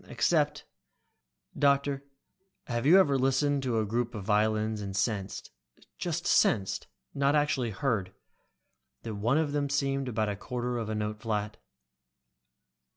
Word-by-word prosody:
Except - - +1 0.9
"Doctor, 140 -1 +2 0.6
have 120 +2 -1
you 175 +5 +8
ever 140 -7 +3
listened 135 +2 +2
to 125 -3 -1
a 110 - +1
group 120 +3 -2
of 105 - -5
violins 110 +1 +1
and 100 -1 -5
sensed, 100 -1 -2 0.5
just - - -2
sensed, 95 -2 +2 0.3
not 140 +1 +2
actually 145 -5 +1
heard, 105 -4 -1 0.9
that 115 - -5
one 115 +7 +1
of 155 -2 +1
them 145 -1 -1
seemed 135 -1 0
about 110 -2 0
a 105 - -2
quarter 120 +4 -3
of 110 -2 -4
a 110 - -2
note 105 0 -3
flat?" 105 -2 -3
120 Hz, 140 wpm, -29 LUFS, 105-140 Hz, 0.9 s, you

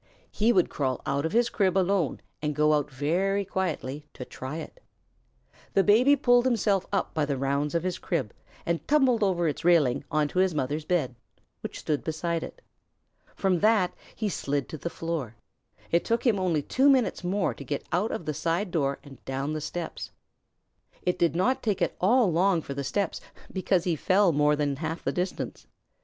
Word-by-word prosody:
He 220 +3 +2
would 185 -7 +2
crawl 130 -3 -2
out 140 +3 0
of - - -7
his 235 +3 +3
crib 195 -3 +1
alone 185 -5 +1 0.2
and 150 -1 -2
go 150 +1 +3
out 150 -1 +1
very 180 +9 0
quietly 150 -7 -3
to 125 - -7
try 130 +5 -6
it. - - -9 0.9
The 195 - +5
Baby 245 +8 +5
pulled 245 -3 +4
himself 210 -6 +1
up 200 - -1
by 155 - 0
the 140 -2 -1
rounds 140 +3 -1
of 170 - +1
his 185 -1 -2
crib, 135 - -2 0.3
and 170 -1 -2
tumbled 265 -6 +3
over 180 -4 +2
its 150 - -3
railing 150 -7 +3
onto 155 +3 0
his 185 -3 +2
mother's 150 +2 -2
bed, 155 -9 0 0.5
which - - -6
stood 150 -2 -2
beside 165 +1 -2
it. - - -9 0.7
From 190 -3 +1
that 210 -3 +3 0.2
he 215 - -2
slid 145 -7 -2
to 155 - -6
the 170 - -3
floor. 165 -10 -4 0.6
It 170 - +3
took 230 +2 -1
him 220 -5 +3
only 170 -6 +1
two 270 - +3
minutes 255 -8 +2
more 190 +2 0
to - - -10
get 140 +1 -4
out 205 +6 +1
of 170 - -4
the 155 - -2
side 170 +6 -1
door 140 -5 0
and 140 -2 -14
down 135 +3 -3
the 155 - -3
steps. 170 +3 -5 0.9
It 180 -1 0
did 170 -1 +2
not 245 +10 +1
take 210 -4 0
at - - 0
all 220 +1 +4
long 175 0 +2
for 140 - -5
the 140 0 -4
steps, 195 +6 -2 0.3
because 185 -2 +1
he 175 -3 0
fell 185 +4 +3
more 150 0 +3
than 145 -2 -1
half 160 +2 -4
the 135 - 0
distance. 180 - -4
170 Hz, 190 wpm, -27 LUFS, 150-195 Hz, 0.9 s, The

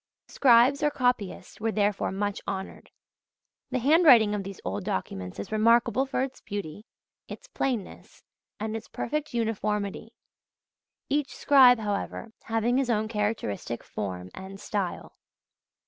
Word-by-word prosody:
Scribes 255 +2 +5
or 295 - +3
copyists 245 -9 -2
were 225 0 0
therefore 205 -1 0
much 205 +1 -2
honoured. 195 -1 -6 0.8
The - - -1
handwriting 255 -6 +6
of 205 - -1
these 195 -1 -8
old 95 +2 -3
documents 95 -1 -4
is 100 - -6
remarkable 230 +4 +3
for 260 - -1
its 265 0 -6
beauty, 205 +1 -6 0.4
its - - -10
plainness, 260 - -4 0.4
and 220 +1 -3
its 225 - -6
perfect 300 +3 -3
uniformity; 215 -2 -2 0.9
each 285 -1 -1
scribe, 260 -3 +6
however, 210 +1 -4
having 225 +2 +1
his 265 -2 -1
own 220 -2 +1
characteristic 210 - -3
form 90 -3 -6
and 190 +1 -9
style. 195 -4 -4
220 Hz, 130 wpm, -27 LUFS, 195-245 Hz, 0.9 s, handwriting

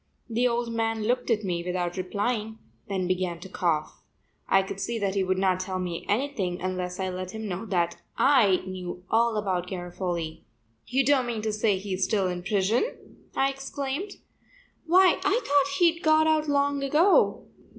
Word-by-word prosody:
The 240 +1 +1
old 235 -1 -1
man 225 -1 -1
looked 245 +4 0
at 220 -2 +1
me 175 -3 -2
without 180 -1 -2
replying, 210 +4 -2 0.3
then 190 -2 -1
began 180 -2 -1
to 190 - -8
cough. 165 -5 -1 0.5
I 195 0 +5
could 195 0 -6
see 230 +4 -2
that 200 -3 -1
he 195 -1 +1
would 185 0 0
not 185 -1 +2
tell 185 0 -3
me 180 -2 -4
anything 205 -7 -1
unless 180 0 -3
I 190 0 -1
let 185 0 -5
him 220 -1 -5
know 195 +3 -4
that 170 -3 -1 0.2
I 220 -10 +4
knew 180 -1 -6
all 230 0 +3
about 185 -4 -1
Garofoli. 175 -3 -4 0.5
"You 265 +3 +1
don't 265 -3 +3
mean 225 -3 -3
to 215 -1 -1
say 210 -2 +2
he 195 0 -5
is 185 +1 -1
still 200 -2 +1
in 180 -1 -3
prison?" 205 - -1 0.2
I 270 0 +2
exclaimed. 275 +7 -4 0.7
"Why, 370 +2 +5
I 390 +5 +3
thought 285 0 +2
he'd 340 -1 +3
got 315 -1 +4
out 310 -1 +2
long 285 0 +1
ago." 310 +8 +3
205 Hz, 180 wpm, -27 LUFS, 185-265 Hz, 0.7 s, I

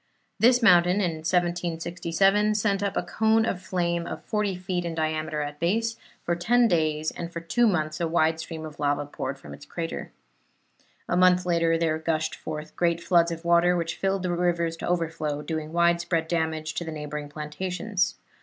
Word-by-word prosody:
This 245 +1 +5
mountain, 180 -3 +6
in 180 -6 0
1767, 175 +4 +1
sent 200 -2 +1
up 200 -1 -1
a - - +1
cone 220 0 +2
of 180 -5 -2
flame 170 -2 -1
of - - -6
forty 210 -3 -1
feet 180 0 -3
in 170 -1 -4
diameter 155 -1 -1
at 145 0 -7
base, 225 +7 0 0.3
for 170 - 0
ten 235 +8 +3
days, 155 -4 +1
and 170 0 -6
for 170 - -5
two 230 +9 +2
months 155 -6 0
a 170 - +1
wide 160 -1 +2
stream 160 -1 -6
of 150 -2 -10
lava 145 0 0
poured 140 -1 -5
from 135 - -11
its - - -11
crater. 165 -1 -5 1.0
A - - 0
month 180 0 +4
later 165 -1 +2
there 160 -1 0
gushed 160 -1 -1
forth 155 0 -7
great 170 -1 +1
floods 170 0 +3
of 165 0 -6
water, 170 +1 +4
which 165 -1 -2
filled 195 -1 -1
the 180 - -1
rivers 170 -1 0
to - - -5
overflow, 160 -4 -1
doing 155 -1 -4
widespread 170 -1 +1
damage 160 -2 -1
to 170 - -3
the 160 - -6
neighboring 150 -1 -5
plantations. 180 +7 -2
170 Hz, 180 wpm, -26 LUFS, 160-180 Hz, 1.0 s, mountain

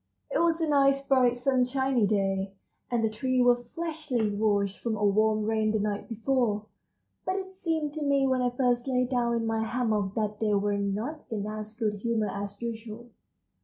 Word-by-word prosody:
It - - +1
was 335 -1 +2
a 325 - 0
nice, 275 -1 +3
bright, 250 -3 +4
sunshiny 255 -2 +1
day, 195 -1 0 0.3
and 240 -2 0
the - - +4
trees 250 +3 +1
were 245 0 +3
freshly 305 -10 -1
washed 205 -1 0
from 230 -2 -2
a 210 - +1
warm 215 +1 +3
rain 220 0 +1
the 215 0 +1
night 205 0 -2
before, 225 -2 0 0.6
but 370 - -1
it 380 -1 -5
seemed 320 -5 -2
to 310 - -5
me 280 -1 +2
when 260 -1 +2
I 250 - +2
first 245 0 0
lay 250 -1 +2
down 240 -2 0
in 230 -1 -1
my 225 0 0
hammock 220 -4 -1
that 210 -1 -2
they 210 -2 +2
were 200 0 +1
not 215 +10 -3
in 210 -3 -3
as 215 0 -6
good 215 -3 -1
humor 220 0 0
as 200 0 -6
usual. 230 +1 -6
235 Hz, 190 wpm, -28 LUFS, 210-265 Hz, 0.6 s, bright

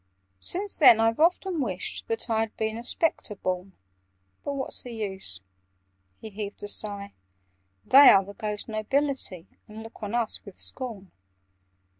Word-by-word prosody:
"Since 395 - -3
then 245 -7 +8
I've 225 +2 +2
often 350 0 +2
wished 190 -7 -3
that 225 +1 -2
I 225 -2 +1
Had 225 -1 -2
been 220 0 -1
a 230 - -6
Spectre 250 -4 0
born. 185 0 -3 0.7
But 285 - -3
what's 275 -1 -4
the 245 - -9
use?" 190 - -3 0.8
(He 220 - -9
heaved 205 0 -7
a - - -4
sigh.) 200 -1 -2 0.7
"They 275 +2 +9
are 195 -1 +6
the 200 - -10
ghost 210 0 -4
nobility, 220 - -2 0.2
And 215 +1 -9
look 225 0 -13
on 210 +2 -3
us 235 -2 0
with 200 -3 -13
scorn. 225 -8 -2
220 Hz, 155 wpm, -27 LUFS, 200-255 Hz, 0.8 s, They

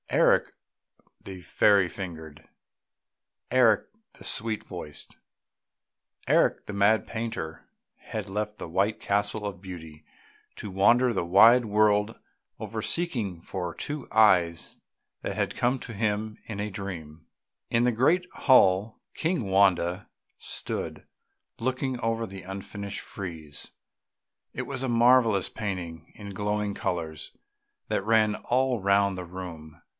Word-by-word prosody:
Eric - - +3 0.7
the 95 -1 -8
fairy 95 +1 +4
fingered,... 80 -5 -8 1.0
Eric 120 -4 +4 0.3
the - - -10
sweet 110 -1 -1
voiced,... 85 -5 -9 1.1
Eric - - +3
the 105 - -6
mad 100 +2 +3
painter, 110 -9 -5 0.3
had - - -6
left 105 +2 -3
the - - -6
white 100 +6 0
castle 100 +1 0
of 100 -3 -5
beauty, 80 -5 -10 0.5
to 105 - -6
wander 120 +6 +4
the - - 0
wide 110 +8 +7
world 105 0 +2 0.4
over - - -4
seeking 115 - -1
for 90 0 -5
two 150 0 -5
eyes 90 -7 +3 0.4
that - - -4
had - - -1
come 125 +2 +1
to 120 - -8
him 105 0 -1
in 105 -2 -6
a 105 0 -3
dream. 85 -5 -7 0.4
In 115 +1 +2
the 125 - +2
great 165 +10 +2
hall 105 -4 +4
King 160 - -1
Wanda 95 -1 +2 0.3
stood, - - -4 0.5
looking 130 +2 -2
on 115 0 -1
the 95 0 -9
unfinished 100 +2 -6
frieze; 80 -7 -7 0.8
it - - -4
was 130 - -5
a 130 - -1
marvellous 115 -4 +4
painting 90 -6 -5
in 100 -1 -8
glowing 105 +1 -1
colours 80 -5 -4 0.6
that - - -1
ran 110 -1 +3
all 125 -1 0
round 100 0 +3
the 90 - -4
room. 85 -4 -9
100 Hz, 125 wpm, -27 LUFS, 90-115 Hz, 1.1 s, wide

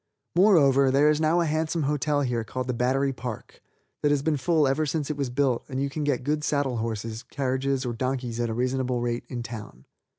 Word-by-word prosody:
Moreover, 145 -9 +5
there 145 +3 +4
is 150 +1 0
now 160 +2 +3
a - - +1
handsome 160 +1 0
hotel 145 +1 +1
here 120 -4 -1
called 130 +3 -4
the 125 - -2
Battery 135 +3 +1
Park 120 -3 -7 0.4
that 145 - +2
has 145 -1 +1
been 160 0 +1
full 155 +1 +2
ever 135 +4 +1
since 150 0 -1
it - - -3
was 140 -3 -2
built 125 -1 +1
and 130 -1 -3
you 140 0 -1
can 155 +1 -3
get 140 -3 0
good 150 +2 -1
saddle 140 -5 0
horses, 110 0 -3
carriages 135 0 -1
or 120 - -2
donkeys 125 -1 -3
at 120 -1 0
reasonable 125 +1 -1
rates 120 0 -3
in 120 -2 -4
town. 105 - -9
135 Hz, 210 wpm, -26 LUFS, 125-150 Hz, 0.4 s, Moreover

